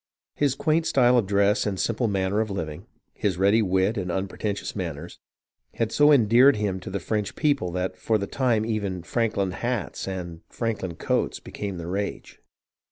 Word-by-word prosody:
His 140 -2 +1
quaint 160 +3 +1
style 125 -2 +4
of 115 -6 +2
dress 100 +2 +2
and 95 -2 -2
simple 115 +5 0
manner 100 0 0
of 110 -1 0
living, 80 -6 -5 0.3
his 95 -4 -1
ready 100 +4 +4
wit 95 +2 +1
and 90 -3 -2
unpretentious 100 +2 -3
manners, 85 -3 -5 0.6
had 115 -1 -1
so 145 +1 +5
endeared 125 +1 +6
him 100 -3 -1
to 90 - -8
the 100 +1 -3
French 105 +3 -2
people 140 - +1
that 90 +1 -2
for 110 - 0
the 100 - -3
time 115 -2 +1
even 100 -6 -2
"Franklin 105 -3 0
hats" 120 +1 -3
and 85 -3 -5
"Franklin 105 -7 -3
coats" - - -1
became 100 -3 -6
the 85 - -6
rage. 100 +4 -4
100 Hz, 170 wpm, -25 LUFS, 95-115 Hz, 0.6 s, endeared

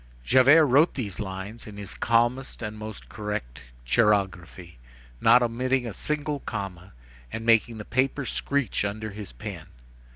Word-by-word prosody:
Javert 135 - +6
wrote 145 +5 +4
these 105 -8 -4
lines 100 +3 -6
in 105 -1 -10
his 100 -2 -7
calmest 120 +2 0
and 105 -1 -4
most 110 -1 -8
correct 105 - -5 0.2
chirography, 90 - 0 0.4
not 125 - +6
omitting 125 +2 0
a 115 - -5
single 150 +2 -2
comma, 95 - -6 0.4
and 115 0 -5
making 115 0 +3
the 105 - -7
paper 135 +2 0
screech 140 -6 -1
under 110 +1 -3
his 105 -1 -7
pen. - - -8
110 Hz, 140 wpm, -26 LUFS, 100-130 Hz, 0.4 s, Javert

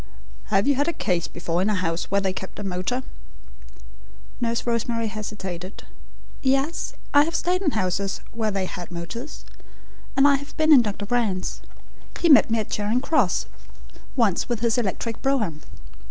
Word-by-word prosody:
"Have 195 +4 +2
you 285 - +5
had 285 +3 0
a 340 - +1
case 175 - 0
before 170 0 -2
in 195 - +2
a 210 - +2
house 165 -2 -1
where 200 - +3
they 190 -1 0
kept 190 0 -7
a 205 - -5
motor?" 195 +7 -2 1.4
Nurse 235 -1 0
Rosemary 230 -1 0
hesitated. 195 -4 -6 0.6
"Yes, 275 +4 0 0.2
I 290 0 +7
have 330 +2 -3
stayed 360 +2 +1
in 360 - +2
houses 195 +1 -1
where 225 -2 -1
they 195 -2 -1
had 180 -1 -7
motors, 180 - -7 0.7
and 275 +1 +7
I 280 -1 +5
have 285 +1 -11
been 310 0 +6
in 265 - +9
Dr. 205 -2 -3
Brand's. 210 -5 -1 0.6
He 340 - +3
met 280 - +8
me 230 - +2
at 215 - -3
Charing 210 +4 +1
Cross 265 - +2 0.7
once 225 -7 +2
with 235 -2 -1
his 235 0 +2
electric 225 +1 -2
brougham." 215 - 0
220 Hz, 170 wpm, -24 LUFS, 190-265 Hz, 1.4 s, in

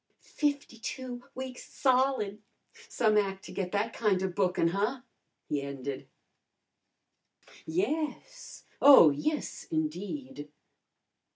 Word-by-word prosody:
"Fifty 285 -6 -2
two 250 +1 -6
weeks 260 -1 -7
solid! 255 -6 +1 0.5
Some 215 -3 +2
ac' 195 -1 -2
to - - -10
get 180 -2 -3
that 210 +3 0
kinda 190 -4 +1
bookin, 180 -2 +1
huh?" 210 +8 -1 0.5
he 145 -1 -1
ended. 140 -1 -6 1.6
"Yes! 305 - -3 0.2
Oh, 265 - +9
yes, 300 - -3
indeed!" 165 - -4
210 Hz, 95 wpm, -30 LUFS, 180-260 Hz, 1.6 s, Oh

